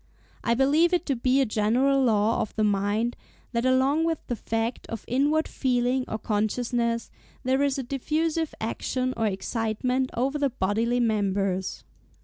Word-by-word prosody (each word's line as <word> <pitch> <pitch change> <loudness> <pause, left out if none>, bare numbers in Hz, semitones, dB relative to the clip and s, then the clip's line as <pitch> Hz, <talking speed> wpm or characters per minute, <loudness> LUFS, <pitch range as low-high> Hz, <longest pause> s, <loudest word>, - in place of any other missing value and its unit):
I 235 - +2
believe 300 +7 +3
it 350 -1 +1
to 275 - 0
be 255 +3 +2
a - - +3
general 245 +6 +2
law 220 -2 +2
of 215 - -4
the 215 - +1
mind 205 +3 +1 0.4
that 235 +1 0
along 265 +5 +3
with 330 -1 +1
the 240 - -2
fact 225 +2 -3
of 230 - -6
inward 290 +5 +2
feeling 255 0 0
or 220 - -3
consciousness, 230 +2 -1 0.3
there 260 +2 +2
is 280 -1 +1
a 270 - -2
diffusive 310 +5 -1
action 255 +3 -2
or 225 - 0
excitement 230 +5 -1
over 270 +5 0
the 280 -1 +2
bodily 230 +2 0
members." 195 -4 0
245 Hz, 155 wpm, -26 LUFS, 220-270 Hz, 0.4 s, believe